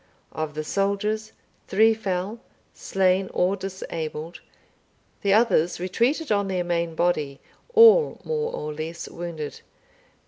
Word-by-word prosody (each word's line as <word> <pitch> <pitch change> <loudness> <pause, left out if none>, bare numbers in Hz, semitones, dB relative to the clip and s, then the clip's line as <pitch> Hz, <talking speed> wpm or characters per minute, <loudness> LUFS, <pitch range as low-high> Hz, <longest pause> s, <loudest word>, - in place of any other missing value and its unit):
Of 155 -1 -4
the 155 - -3
soldiers, 200 +5 -1 0.4
three 220 +3 +4
fell, 200 0 -3 0.3
slain 190 0 +1
or 185 +2 +2
disabled; 170 -4 -6 0.8
the 200 - +1
others 200 -7 +3
retreated 235 - 0
on 200 -1 +2
their 185 -2 -1
main 170 -1 -1
body, 155 -5 0 0.4
all 455 +1 +7
more 465 0 -2
or 150 0 -4
less 160 +2 -6
wounded. 165 -3 -6
185 Hz, 115 wpm, -24 LUFS, 170-215 Hz, 0.8 s, all